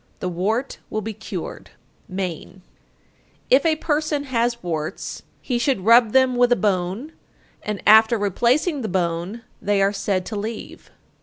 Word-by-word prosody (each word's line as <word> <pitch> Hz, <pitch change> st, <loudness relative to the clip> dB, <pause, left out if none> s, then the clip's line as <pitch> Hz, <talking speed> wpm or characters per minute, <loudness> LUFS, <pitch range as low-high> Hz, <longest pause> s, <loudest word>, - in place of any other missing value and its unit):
The 185 Hz, -, -2 dB
wart 215 Hz, +9 st, -2 dB
will 215 Hz, -, -2 dB
be 220 Hz, +1 st, -4 dB
cured. -, -, -7 dB, 0.4 s
Maine. 185 Hz, 0 st, -5 dB, 0.9 s
888. -, -, +9 dB
If 275 Hz, -, +2 dB
a 315 Hz, -, +3 dB
person 300 Hz, -1 st, 0 dB
has 240 Hz, -3 st, -1 dB
warts, 160 Hz, -3 st, -4 dB, 0.2 s
he 245 Hz, -2 st, -1 dB
should 240 Hz, -4 st, +1 dB
rub 230 Hz, -1 st, +6 dB
them 260 Hz, 0 st, +4 dB
with 245 Hz, 0 st, +3 dB
a -, -, +6 dB
bone, 200 Hz, -, -1 dB, 0.5 s
and 210 Hz, -2 st, -4 dB
after 220 Hz, +2 st, +7 dB
replacing 245 Hz, -, +1 dB
the 220 Hz, -, -3 dB
bone 180 Hz, +4 st, -2 dB, 0.2 s
they 205 Hz, 0 st, +1 dB
are 195 Hz, +1 st, +2 dB
said 195 Hz, -2 st, -1 dB
to 220 Hz, -, -5 dB
leave. 215 Hz, +2 st, -6 dB
220 Hz, 155 wpm, -22 LUFS, 190-245 Hz, 0.9 s, 888